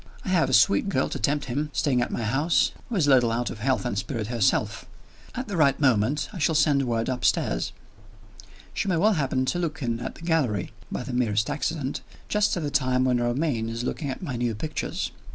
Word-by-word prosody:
I - - -3
have 180 -6 +3
a - - -1
sweet 105 - +4
girl 135 -8 0
to - - -4
tempt 145 +1 0
him, 140 +4 -2
staying 130 -4 +1
at - - -1
my 115 - -3
house, 140 +9 +2 0.2
who 235 - -3
is 175 -7 +3
a 145 - +4
little 125 -3 +5
out 120 +1 -1
of 110 - -8
health 130 +3 0
and 120 - -1
spirits 110 +1 -3
herself. 115 -5 0 0.5
At 255 +1 -4
the 205 - -4
right 145 -5 +3
moment, 130 +1 +2
I 185 - -6
shall 160 +1 +2
send 145 -3 +3
word 115 -1 0
upstairs. 125 - 0 1.0
She - - -2
may 180 -3 +2
well 210 +6 +4
happen 135 -5 0
to 175 +7 -1
look 160 -4 -3
in 115 -1 -1
at 120 - -5
the - - -14
gallery 135 - 0 0.2
(by - - -3
the 130 - -6
merest 110 -3 +1
accident) 145 -4 -2 0.3
just 210 -2 +2
at 170 - -2
the 145 - -2
time 130 -2 +2
when 125 -1 +2
Romayne 120 -1 0
is 115 +1 -4
looking 140 +3 -3
at 135 - -5
my 140 -8 -3
new 120 -2 -1
pictures. 155 +9 -3
130 Hz, 225 wpm, -25 LUFS, 120-155 Hz, 1.0 s, little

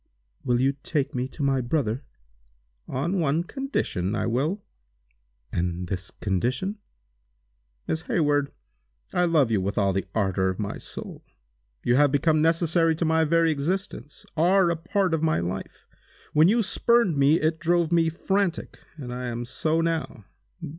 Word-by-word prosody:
"Will 120 -1 +1
you 135 +2 +2
take 145 -5 -1
me 125 0 -1
to 145 - -6
my 135 -1 +2
brother?" 125 -1 -1 0.8
"On 170 +9 -1
one 160 +1 +1
condition, 170 - -2
I - - -1
will." 150 - -1 0.9
"And 90 0 -2
this 95 -1 -3
condition?" 130 - -2 1.1
"Miss 160 - -1
Hayward, 145 -3 +1 0.6
I 180 - +3
love 155 -8 +3
you 105 -4 +2
with 100 +2 -3
all 100 -1 +2
the 95 - -2
ardor 95 -3 +1
of 95 - -3
my 100 -1 -4
soul. - - -8 0.6
You 120 - +3
have 145 -1 +4
become 155 +2 +2
necessary 165 0 +2
to 165 - -1
my 160 0 +3
very 165 +1 +3
existence—are 175 +2 0
a - - 0
part 185 +2 0
of 160 - +1
my 160 - +2
life. 90 +3 -5 0.5
When 155 +2 +6
you 230 +4 +3
spurned 230 -2 +2
me, 140 +3 +4
it 160 +1 0
drove 170 -1 +1
me 165 -1 +3
frantic, 190 +2 -1 0.2
and 125 -5 -6
I 125 0 -4
am 120 0 -4
so 155 +6 0
now. 165 -10 -2
155 Hz, 155 wpm, -25 LUFS, 120-170 Hz, 1.1 s, When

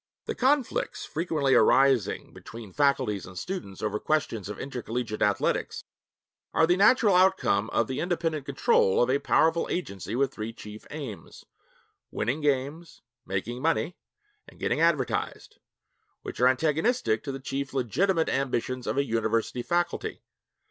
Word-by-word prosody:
The - - -2
conflicts 265 0 0
frequently 155 -4 0
arising 135 -6 +3
between 110 -4 -11
faculties 135 -9 +1
and 95 0 -11
students 140 - -6
over 105 0 -1
questions 115 -10 -1
of 105 - -6
intercollegiate 120 -4 -4
athletics 100 -1 0 0.7
are 160 - +5
the 175 +2 +3
natural 210 +2 +5
outcome 190 +1 +3
of - - +1
the 130 - -4
independent 165 -5 -2
control 130 -7 +3
of 125 - +1
a 140 - +2
powerful 165 +3 +2
agency 105 - -4
with 135 +1 +1
three 110 +1 -5
chief 105 -1 -11
aims 140 -9 -8 0.6
winning 125 +8 -2
games, 145 +4 -2 0.2
making 100 +7 -3
money, 165 +3 0 0.5
and - - -17
getting - - 0
advertised 165 -6 0 0.6
which - - -7
are 125 - +5
antagonistic 155 - +1
to 140 - -4
the 135 - -6
chief 135 +1 -4
legitimate 160 - +1
ambitions 130 -2 -1
of - - -1
a 140 - +2
university 115 0 -1
faculty. 175 +7 -2
135 Hz, 140 wpm, -27 LUFS, 115-165 Hz, 0.7 s, are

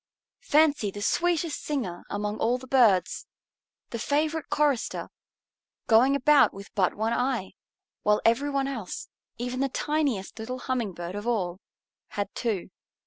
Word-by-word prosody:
Fancy 295 -8 +4
the 205 +1 -6
sweetest 340 +2 +1
singer 245 -13 -3
among 210 +1 -3
all 240 +2 +2
the 255 - -11
birds, 230 -9 +3 0.6
the 235 - -4
favorite 305 +5 0
chorister, 290 -5 0 0.8
going 245 +5 +5
about 285 +1 +5
with 200 +1 -11
but 190 -3 +1
one 220 +2 0
eye, 245 -7 -1 0.5
while 210 0 +3
every 240 +6 +3
one 275 -1 0
else, 230 -9 -5 0.3
even 245 +2 -3
the 275 0 +1
tiniest 275 -9 -1
little 250 +3 -4
Humming 250 -6 -2
Bird 175 +1 -6
of 205 +3 -5
all, 185 -6 -1 0.5
had 200 -1 -4
two. 210 -7 -2
240 Hz, 140 wpm, -27 LUFS, 205-280 Hz, 0.8 s, going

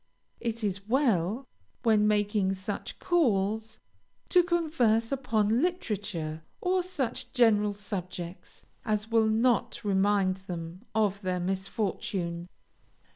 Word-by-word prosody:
It 230 -1 -3
is 195 0 -2
well, 230 - +2 0.4
when 215 -3 +4
making 205 -2 +2
such 195 +2 -5
calls, 220 - +1 0.5
to 360 - +6
converse 300 -10 +1
upon 230 -4 +1
literature, 205 - -2 0.2
or 365 0 +1
such 285 -10 -3
general 210 -4 +4
subjects 185 -3 -7 0.2
as 215 -1 -1
will 225 -1 +4
not 225 +1 +1
remind 195 -1 +2
them 175 -1 -7
of 205 -2 +1
their 185 -2 -1
misfortune. 185 -2 -2
210 Hz, 105 wpm, -29 LUFS, 190-230 Hz, 0.5 s, to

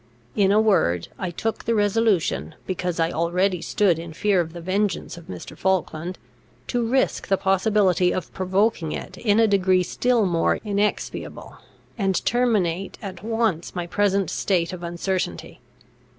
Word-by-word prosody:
In 195 -2 +3
a 210 - +5
word, 135 - +2
I 185 - -2
took 220 +6 -3
the 230 - +1
resolution, 205 - +1
because 180 -2 -3
I 165 +1 +2
already 180 +2 0
stood 180 -4 +2
in 165 -1 -8
fear 195 +2 +2
of 165 -1 -5
the 175 - -7
vengeance 195 +4 -1
of 170 -1 -13
Mr. 90 -2 -8
Falkland, 180 -2 -1 0.5
to 245 -1 0
risk 260 +3 0
the 195 - +2
possibility 190 -2 +2
of 185 - -4
provoking 190 -2 0
it - - -6
in 210 -2 +2
a 225 - +6
degree 185 -2 +3
still 240 +3 +1
more 170 -3 +2
inexpiable, 205 0 -2 0.4
and 195 -2 0
terminate 195 -7 +1
at 190 -2 -8
once 225 -7 -1
my 175 -1 -2
present 200 +2 +1
state 175 -3 0
of 180 - -7
uncertainty. 175 - -3
190 Hz, 150 wpm, -23 LUFS, 175-210 Hz, 0.5 s, a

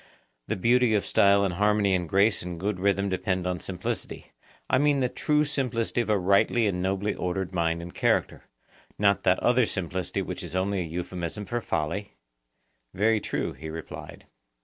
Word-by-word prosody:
Then - - -2
beauty 120 0 +4
of 105 - 0
style 100 0 +4
and 95 - -1
harmony 105 +1 +2
and 90 -3 -1
grace 100 +3 +3
and 85 -1 -6
good 100 0 -2
rhythm 100 +1 +1
depend 95 -1 -1
on 90 -1 -1
simplicity,—I 95 +7 -4
mean 145 -1 +3
the 125 -2 +1
true 150 +3 +1
simplicity 125 -5 -1
of 115 - -4
a 105 - +3
rightly 100 +5 +3
and 90 -3 0
nobly 95 +2 0
ordered 90 +1 -3
mind 85 -1 0
and 85 - -9
character, - - 0 0.5
not 100 -1 +3
that 90 - +4
other 120 -1 +3
simplicity 90 -1 -3
which - - -5
is - - -7
only 95 +1 0
an 85 - -5
euphemism 90 +3 -4
for 120 +2 -2
folly? 95 +3 -3 0.8
Very 110 +3 +3
true, - - -2
he 80 +4 -8
replied. 80 0 -8
100 Hz, 170 wpm, -27 LUFS, 90-110 Hz, 0.8 s, beauty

